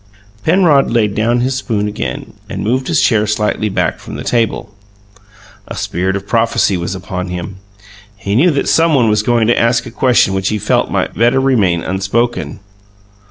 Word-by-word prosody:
Penrod 160 -5 +3
laid 110 -3 +1
down 120 +3 +1
his 130 +2 0
spoon 110 -5 -2
again 65 -12 -5 0.2
and - - -4
moved 130 +5 -1
his - - +1
chair 110 -2 +2
slightly 105 0 -1
back 95 - -1
from - - -9
the - - -6
table. 115 -3 -1 0.9
A - - -7
spirit 95 +3 -2
of 100 0 -5
prophecy 115 -3 +1
was 85 +2 -3
upon 90 0 -5
him: 90 +1 -6 0.6
he 100 0 -4
knew 155 +10 +4
that 145 -4 -1
someone 155 -8 +3
was 105 0 +2
going 115 0 +1
to 120 - +2
ask 115 0 +1
a - - -8
question 120 -5 +2
which 95 0 -1
he 105 - -1
felt 100 - 0
might - - -1
better 120 +4 +2
remain 105 -11 +1
unspoken. 100 +7 -2
110 Hz, 175 wpm, -15 LUFS, 95-120 Hz, 0.9 s, knew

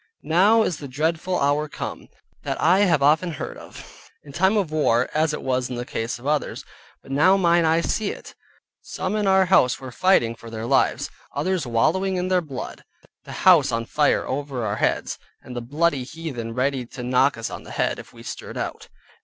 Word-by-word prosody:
Now 205 +7 +4
is 175 -7 -1
the 145 - -7
dreadful 160 +6 -1
hour 145 +2 +1
come, - - -6 0.3
that - - -4
I 180 +4 +4
have 170 -8 +3
often 160 +4 +3
heard - - -6
of - - -13
(in 145 - -12
time 190 +8 +2
of 185 -7 0
war, 125 -6 +2
as 155 +1 +2
it 150 - -5
was 130 -1 0
the 120 -1 -5
case 115 -1 -3
of 120 - -15
others), 150 0 -1 0.4
but 135 - -12
now 155 +8 +4
mine 170 -2 +3
eyes 165 +1 +2
see 215 -2 -1
it. - - -8 0.5
Some 190 +2 -4
in 210 -2 0
our 190 0 +5
house 175 -9 +3
were 130 -1 -8
fighting 125 -7 +3
for 115 0 -12
their 110 0 -5
lives, - - +1 0.2
others 185 -6 -1
wallowing 170 +12 +1
in 180 0 -1
their 185 -1 +3
blood, 140 -6 -7 0.4
the - - -9
house - - +6
on 115 0 -1
fire 150 +5 +1
over 135 -3 -3
our 105 0 -2
heads, - - -1 0.2
and 125 - -9
the 120 - -3
bloody 145 +2 0
heathen 125 -6 -6
ready 130 0 0
to 125 - -8
knock 125 +2 +2
us 115 - -4
on - - -7
the - - -13
head, - - -1
if - - -12
we - - -14
stirred - - -7
out. - - -5
150 Hz, 205 wpm, -23 LUFS, 125-180 Hz, 0.5 s, house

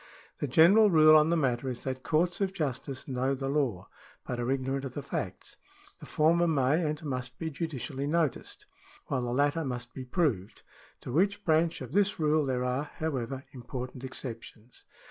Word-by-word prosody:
The 145 - -1
general 190 - +6
rule 155 -3 +7
on 155 +1 +5
the 170 - +2
matter 130 -3 0
is 125 -2 -5
that 130 -1 -4
courts 170 +6 0
of 195 -1 0
justice 135 -5 -4
know 130 +1 0
the 135 0 -4
law, 130 -11 -1 0.4
but 125 - -4
are 120 +1 -2
ignorant 135 0 -1
of 130 -2 -6
the 145 - -4
facts. - - -5 0.4
The - - -11
former 170 +2 +3
may 150 +1 +2
and 155 0 -3
must 130 -2 -4
be 160 -1 -4
judicially 140 -2 -4
noticed, 155 -3 -1 0.4
while 130 - 0
the 120 -1 -3
latter 145 +5 +1
must 125 -3 -5
be 130 - -6
proved. 125 - -1 0.4
To 145 +8 +1
each 205 +1 -1
branch 160 0 +2
of 130 - -7
this 200 +2 +2
rule 155 -1 +2
there 125 -1 0
are, 125 +3 -1
however, 135 -4 -3
important 125 0 -7
exceptions. 120 -3 -8
140 Hz, 180 wpm, -29 LUFS, 125-160 Hz, 0.4 s, rule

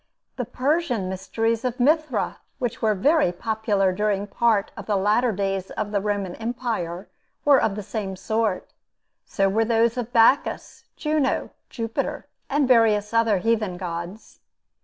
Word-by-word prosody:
The 250 - -3
Persian 260 - 0
mysteries 225 +5 -1
of 250 0 -2
Mithra, 295 -3 +1 0.2
which 245 -4 -3
were 215 -1 +2
very 290 - +3
popular 205 0 0
during 205 0 0
part 215 -1 +1
of 195 - -9
the 210 - +1
latter 215 +5 +2
days 195 -1 -2
of 210 -1 -4
the 200 -2 0
Roman 200 -3 -2
empire, 225 -7 -3 0.4
were 285 -2 +6
of 215 -3 0
the 210 - -5
same 195 -1 -4
sort. 220 0 -2 0.5
So 195 -1 +1
were 215 +4 +2
those 230 +1 +2
of 240 -1 -4
Bacchus, 245 +3 +2
Juno, 300 -3 0 0.2
Jupiter, 230 -2 -3 0.2
and 285 -1 +2
various 220 -4 +3
other 230 -3 +3
heathen 215 -2 0
gods. 175 +3 -7
220 Hz, 145 wpm, -24 LUFS, 195-240 Hz, 0.5 s, were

